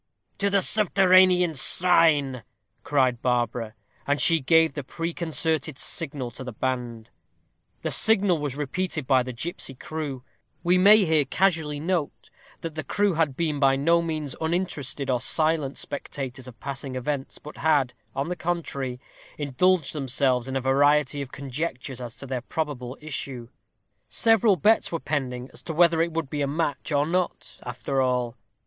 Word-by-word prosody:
"To 200 0 +2
the 200 -1 +2
subterranean 185 -4 +4
shrine," 145 -4 +3 0.4
cried 130 -4 +1
Barbara. 120 -2 -1 0.3
And 145 +1 +1
she 165 -1 +4
gave 160 +3 +4
the 145 - -5
preconcerted 160 -1 -2
signal 140 -7 -1
to 125 - -8
the 125 - -6
band. 120 -2 -3 0.7
The - - -1
signal 200 -6 +4
was 145 -3 -3
repeated 150 +1 -2
by 130 -1 +4
the 125 +1 -5
gipsy 135 +1 -5
crew. 145 -2 -5 0.4
We 180 +1 +3
may 205 +2 +7
here 160 -3 +3
casually 160 -1 0
note, 165 -1 -3 0.3
that 165 -1 -5
the 155 0 -4
crew 200 +7 +1
had 155 -5 0
been 155 -4 -1
by 135 -1 +4
no 165 +5 +3
means 155 -4 -4
uninterested 160 -5 -2
or 125 -1 0
silent 155 -1 0
spectators 130 -2 -6
of 120 -2 -12
passing 135 -1 -5
events, 135 +2 -3
but 150 - -11
had, 145 -6 +2 0.2
on 135 +2 -1
the 180 - -2
contrary, 140 -8 -3 0.4
indulged 150 +3 +1
themselves 130 -3 0
in 130 - -4
a 135 - 0
variety 145 +1 +3
of 135 -2 -7
conjectures 135 -2 -5
as 120 -2 -7
to - - -8
their 130 -2 -3
probable 130 -3 -4
issue. 130 -5 -6 0.6
Several 225 -3 +4
bets 215 +7 +3
were 165 - -2
pending 130 -5 -3
as - - -9
to 160 - -6
whether 170 -1 +4
it 170 +1 0
would 160 -4 -3
be 150 - -2
a 140 - +1
match 150 +1 -2
or 145 0 +2
not 180 +2 -3
after 130 +2 -2
all. 125 -2 0
145 Hz, 160 wpm, -25 LUFS, 130-165 Hz, 0.7 s, may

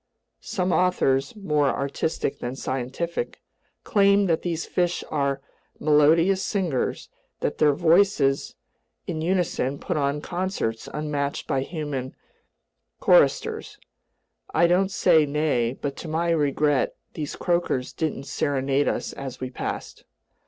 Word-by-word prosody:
Some 185 -1 -2
authors—more 150 - +1
artistic 140 +2 -2
than 120 +2 -4
scientific—claim 170 - -1
that 165 -3 +1
these 170 -2 -2
fish 175 -1 0
are 140 -2 0 0.4
melodious 160 +5 +4
singers, 175 -11 -1 0.3
that - - -2
their 150 -2 +4
voices 165 -5 +3 0.5
in 155 - -3
unison 165 -6 0
put - - -3
on 140 0 0
concerts 175 - -3
unmatched 145 -2 -2
by 135 - 0
human 140 -4 -4 0.8
choristers. 455 -3 +3 0.7
I 170 - +4
don't 180 +3 +3
say 165 -6 +4
nay, 140 -5 0
but 140 -1 -3
to - - -7
my 165 +2 0
regret 145 -2 +1 0.2
these 150 -3 -4
croakers 170 -8 -1
didn't 155 -4 -2
serenade 140 0 0
us - - -2
as 135 -2 -7
we 130 -1 -5
passed. - - -5
150 Hz, 115 wpm, -25 LUFS, 140-175 Hz, 0.8 s, melodious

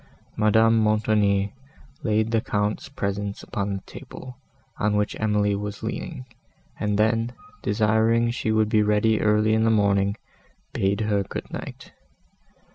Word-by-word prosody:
Madame 110 +1 +4
Montoni 105 -2 +2 0.5
laid 110 0 +1
the 115 -1 +2
Count's 105 +6 -2
presents 100 -5 -3
upon 100 -1 -3
the 95 - -7
table, 130 -1 -10 0.4
on 105 0 +1
which 105 0 0
Emily 105 -1 +1
was 105 0 -5
leaning, 65 - -5 0.5
and 105 -1 0
then, 115 +2 +1 0.3
desiring 110 +2 +2
she 110 -2 -2
would 110 -1 +3
be 110 -1 +3
ready 105 +1 +2
early 105 0 +3
in 110 0 +2
the 115 - +3
morning, 100 -1 +2 0.6
bade 100 +2 0
her 105 -2 +1
good 95 - -6
night. - - -8
105 Hz, 135 wpm, -24 LUFS, 100-110 Hz, 0.6 s, Madame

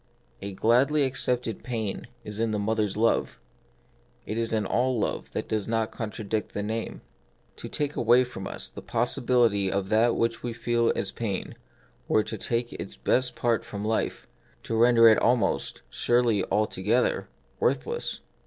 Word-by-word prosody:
A 100 0 -5
gladly 130 +9 +3
accepted 125 -4 -1
pain 115 -5 -3 0.2
is 105 0 -7
in 115 0 +1
the 110 - -1
mother's 105 -1 0
love; 115 +1 +1 0.9
it 110 - -4
is 115 0 -1
in 110 -2 0
all 125 +5 +1
love - - -2
that - - -3
does 110 -2 -2
not 115 -1 0
contradict 110 -1 -4
the 105 - -1
name. 110 +2 -4 0.6
To - - -8
take 145 0 -2
away 120 +2 +5
from 110 -6 -7
us - - -5
the - - -10
possibility 105 -6 +2
of 95 -1 -1
that 115 +2 +3
which 115 0 0
we 120 -1 -3
feel 120 0 +1
as 100 - -1
pain 105 -5 -3 0.5
were 110 - +3
to 110 - -5
take 120 +2 -2
its - - -7
best 130 0 +1
part 120 -2 +1
from 105 0 -6
life, 110 +1 -1 0.4
to 115 - -3
render 115 0 +6
it 110 - +6
almost 120 -4 +1
— - - -37
surely 120 -4 +2
altogether 105 +3 0
— - - -37
worthless. 475 +1 -1
115 Hz, 165 wpm, -27 LUFS, 105-120 Hz, 0.9 s, render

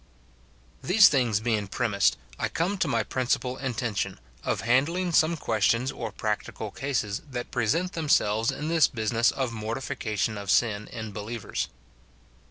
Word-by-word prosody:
These 200 +4 +7
things 120 -7 +2
being 110 -3 0
premised, 100 - +1 0.2
I - - 0
come 185 +4 -1
to 175 - +2
my 115 -6 +1
principal 130 +2 -1
intention, 110 - -2 0.2
of - - -1
handling 160 +10 +2
some 160 +1 +3
questions 115 +1 +1
or 115 -4 -5
practical 105 0 -3
cases 120 -7 -2
that 125 -2 -5
present 160 - 0
themselves 115 -8 +2
in 150 - -5
this 160 -3 +4
business 115 0 +1
of 130 -4 -2
mortification 110 -2 -2
of 100 -1 -7
sin 105 -1 +2
in 110 -2 -6
believers. 105 +2 -4
120 Hz, 140 wpm, -27 LUFS, 110-140 Hz, 0.2 s, These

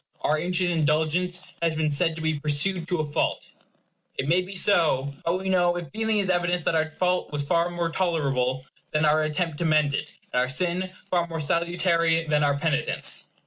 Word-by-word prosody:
Our 155 +1 +1
ancient 180 +1 +1
indulgence 160 +3 0 0.2
has 165 -1 +1
been 155 -1 0
said 165 +3 +1
to 165 - -7
be 160 -2 0
pursued 160 +4 -1
to 180 -4 0
a - - -2
fault. 145 - -2 0.7
It 135 - -2
may 175 +4 +4
be 190 +2 -8
so. 160 -8 +2
But 170 +2 0
we 190 +1 -5
know 175 -2 +2
if 175 -2 -6
feeling 220 0 0
is 200 -2 +1
evidence, 175 -1 +1
that - - +1
our 160 -1 +1
fault 180 +3 -1
was 145 -1 -2
more 170 0 0
tolerable 135 -8 0 0.3
than 155 0 +2
our 155 +1 +3
attempt 155 0 -2
to 170 - -1
mend 155 -2 +3
it; 150 +1 -3 0.2
and 125 - +2
our 125 0 +1
sin 180 +5 0 0.2
far 175 -2 +1
more 165 -1 -5
salutary 170 +1 +1
than 150 -1 +1
our 140 -1 +2
penitence. 150 0 0
165 Hz, 195 wpm, -25 LUFS, 150-175 Hz, 0.7 s, may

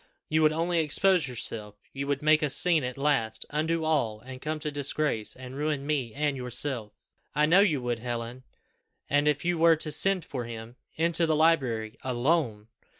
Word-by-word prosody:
You 155 +1 +2
would 155 -1 +5
only 165 +2 0
expose 165 +1 +3
yourself. 110 -4 -5 0.2
You 140 0 -4
would 140 0 -1
make 155 +1 +4
a 150 - +1
scene 165 +2 +4
at 125 +1 -4
last 135 -6 0
undo 160 +2 -1
all, 130 -9 0
and 130 +3 -10
come 155 +1 -3
to 150 -1 -3
disgrace, 145 -5 -1
and 130 0 -10
ruin 145 -1 -2
me 140 -6 -1
and 145 -1 0
yourself. 125 -3 -2 0.4
I 150 +1 +4
know 170 +5 +5
you 160 -11 +2
would, 120 -1 -2
Helen. 120 +1 -5 0.7
And 145 +1 +3
if 150 +1 +1
you 175 -1 0
were 165 0 +6
to 155 0 -4
send 190 +4 +1
for 125 -4 -5
him 115 0 -8 0.2
into 170 +1 +1
the 155 - +2
library 130 -9 +1
alone! 125 -4 -1
145 Hz, 185 wpm, -27 LUFS, 120-155 Hz, 0.7 s, were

